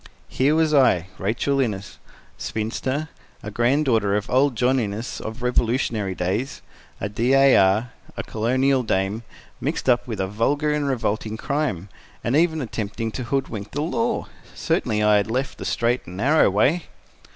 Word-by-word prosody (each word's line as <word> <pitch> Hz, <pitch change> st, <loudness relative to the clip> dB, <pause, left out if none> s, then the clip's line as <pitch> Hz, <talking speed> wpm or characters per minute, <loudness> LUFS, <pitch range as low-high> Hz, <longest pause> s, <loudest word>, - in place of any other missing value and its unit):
Here 140 Hz, +4 st, +2 dB
was 160 Hz, -1 st, +2 dB
I, 95 Hz, -, +4 dB
Rachel 120 Hz, +8 st, 0 dB
Innes, 105 Hz, -6 st, -2 dB, 0.4 s
spinster, 130 Hz, +7 st, -3 dB, 0.3 s
a 105 Hz, -, -6 dB
granddaughter 120 Hz, -4 st, +2 dB
of 105 Hz, 0 st, -3 dB
old 130 Hz, +1 st, +3 dB
John 130 Hz, +3 st, +2 dB
Innes 110 Hz, +1 st, -4 dB
of 110 Hz, +3 st, -6 dB
Revolutionary 115 Hz, -5 st, 0 dB
days, 100 Hz, +11 st, -2 dB, 0.4 s
a 100 Hz, -, -2 dB
D. 115 Hz, +5 st, 0 dB
A. 135 Hz, 0 st, +6 dB
R., 100 Hz, +5 st, +3 dB, 0.3 s
a -, -, -3 dB
Colonial 130 Hz, +4 st, +1 dB
Dame, 100 Hz, -1 st, -1 dB, 0.4 s
mixed -, -, -3 dB
up -, -, +3 dB
with -, -, -4 dB
a 95 Hz, -, +1 dB
vulgar 140 Hz, +10 st, 0 dB
and 150 Hz, -1 st, -1 dB
revolting 110 Hz, -4 st, -2 dB
crime, 135 Hz, -, -2 dB, 0.4 s
and 120 Hz, -, 0 dB
even 160 Hz, 0 st, +2 dB
attempting 110 Hz, 0 st, -4 dB
to 125 Hz, +2 st, -5 dB
hoodwink 120 Hz, -6 st, -3 dB
the 145 Hz, -, -1 dB
law! 230 Hz, +7 st, -1 dB, 0.3 s
Certainly 120 Hz, -, 0 dB
I 105 Hz, 0 st, +5 dB
had 100 Hz, +2 st, 0 dB
left 130 Hz, +4 st, -2 dB
the -, -, -6 dB
straight 120 Hz, +1 st, 0 dB
and 90 Hz, +2 st, -8 dB
narrow 140 Hz, +7 st, +4 dB
way. 135 Hz, -, +2 dB
120 Hz, 160 wpm, -23 LUFS, 105-140 Hz, 0.4 s, A